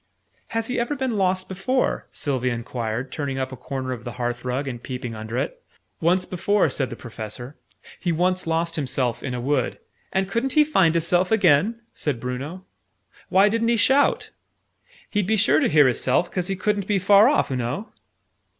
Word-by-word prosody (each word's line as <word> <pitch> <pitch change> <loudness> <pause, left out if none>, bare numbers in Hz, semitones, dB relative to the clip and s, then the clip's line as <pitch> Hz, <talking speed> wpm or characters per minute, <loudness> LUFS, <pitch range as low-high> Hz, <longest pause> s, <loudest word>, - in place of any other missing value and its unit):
"Has 225 -1 -2
he 250 - -2
ever 240 +5 -1
been 260 -4 -1
lost 185 -1 +1
before?" 195 +8 -1
Sylvie 130 -4 -1
enquired, 120 0 -3
turning 140 -3 -3
up 130 0 -2
a - - -6
corner 130 +1 -5
of 120 -2 -5
the 120 - -6
hearth 120 -1 -3
rug, 130 +3 -2
and 120 -3 -5
peeping 125 -2 -5
under 110 +2 -5
it. - - -3 0.4
"Once 180 +3 +2
before," 185 0 +1
said 135 -1 -1
the - - -6
Professor: 120 +3 -8 0.4
"he 175 - -1
once 180 +2 0
lost 165 +1 0
himself 130 -4 -1
in 125 -2 -4
a - - -3
wood 130 0 0 0.2
" - - -39
"And 190 0 0
couldn't 230 +6 -1
he 305 - +6
find 190 - +3
his 165 -1 +2
self 180 +2 +2
again?" 200 +2 +3
said 140 -6 -2
Bruno. 135 +10 -5 0.6
"Why 195 +2 +5
didn't 230 +2 +1
he 235 0 +3
shout? 270 +5 +3 0.8
He'd 205 -3 -1
be 220 +1 +2
sure 145 -6 +4
to - - +2
hear 150 -2 +6
his 125 - +1
self, 130 +7 +1
'cause 180 -1 -2
he 195 - -1
couldn't 200 +1 -1
be 205 - +2
far 200 +4 +6
off, 290 - +1
oo - - 0
know." 125 - -3
165 Hz, 195 wpm, -23 LUFS, 125-200 Hz, 0.8 s, he